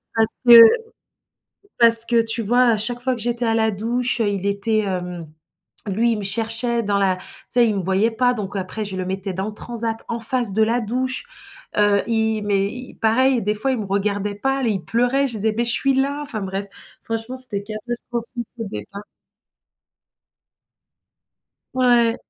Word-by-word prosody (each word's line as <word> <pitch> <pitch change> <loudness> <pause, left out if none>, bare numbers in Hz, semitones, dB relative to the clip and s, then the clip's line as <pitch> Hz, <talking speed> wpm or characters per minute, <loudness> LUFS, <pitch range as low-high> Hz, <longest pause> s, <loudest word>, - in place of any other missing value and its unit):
Parce 225 -1 +2 0.2
que 235 -1 +10 1.2
parce 230 -1 +10
que 235 -1 +3
tu 225 +1 +1
vois? 245 +4 +3
Á - - +1
chaque 240 +3 -1
fois 260 +1 0
que 240 - -8
j'étais 240 +1 -2
à 225 - +1
la 220 -1 +2
douche, 235 +4 -2
il 200 -3 -1
était 200 +2 0
hem, 180 -4 -5 0.6
lui, 225 +4 +1
il 215 - -2
me 200 - -5
cherchait 230 +3 -1
dans 200 -2 0
la 190 -2 +1
tu - - -14 0.3
sais? 240 -2 +3
Il 210 - -1
me 195 - -2
voyait 190 +5 +1
pas, 250 +2 +1
donc 205 -4 -6
après 195 +3 -4
je 195 -2 -6
le 185 -1 -4
mettais 190 +1 -4
dans 190 +2 -3
le 215 - -8
transat 225 0 -4
en 235 0 -4
face 235 -2 +1
de 220 - +2
la 235 +3 +1
douche. 255 - -3 0.5
Heu, 205 -1 +3
i 220 -1 0
mais 200 -1 0
i 250 +1 -9
pareil, 250 +3 +2
des 210 +2 -1
fois, 240 +6 0
il 255 - -2
me 205 - -5
regardait 200 +1 -2
pas, 270 +4 -1
il 205 -6 -1
pleurait, 245 +4 +1
je - - -5
disais: 215 0 0
«Mais 235 - 0
je 235 - 0
suis 275 +1 +2
là», 280 +2 -1
enfin 245 -8 -5
bref, 195 +1 -4 0.4
franchement, 225 +3 -5
c'était 210 -6 -6
catastrophique 235 +2 -6
au 225 - -4
départ. 195 - -8 2.7
Ouais. 240 -2 +3
225 Hz, 185 wpm, -20 LUFS, 200-240 Hz, 2.7 s, que